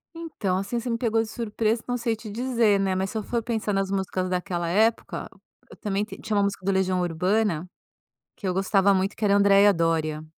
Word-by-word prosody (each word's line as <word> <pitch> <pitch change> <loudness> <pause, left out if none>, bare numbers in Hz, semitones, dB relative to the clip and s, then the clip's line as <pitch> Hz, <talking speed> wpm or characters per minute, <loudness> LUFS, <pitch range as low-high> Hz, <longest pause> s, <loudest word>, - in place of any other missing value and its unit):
Então, 300 - -2
assim, 200 +5 -2
você 240 +2 -5
me 230 - 0
pegou 230 -1 +1
de 225 - -4
surpresa, 225 0 -1
não 245 0 -1
sei 235 -1 -1
te 220 0 -10
dizer, 230 -2 +2
né, 190 -1 0
mas 190 +1 -1
se - - -4
eu 215 - -2
for 235 +2 -2
pensar 220 -3 -2
nas 195 0 0
músicas 190 -1 -2
daquela 180 -1 -2
época, 220 +5 0 0.4
eu - - -12
também 205 -1 -1
t - - -10
tinha 215 - -2
uma 200 - +3
música 200 -2 -2
do 195 - +2
Legião 190 -1 +1
Urbana 180 +1 0 0.7
que 200 - -5
eu 185 - 0
gostava 195 +1 +3
muito, 190 +1 0
que 220 - -2
era 200 - +4
a - - +5
Andreia 200 0 +6
Dória. 160 -2 0
200 Hz, 225 wpm, -25 LUFS, 185-225 Hz, 0.7 s, Andreia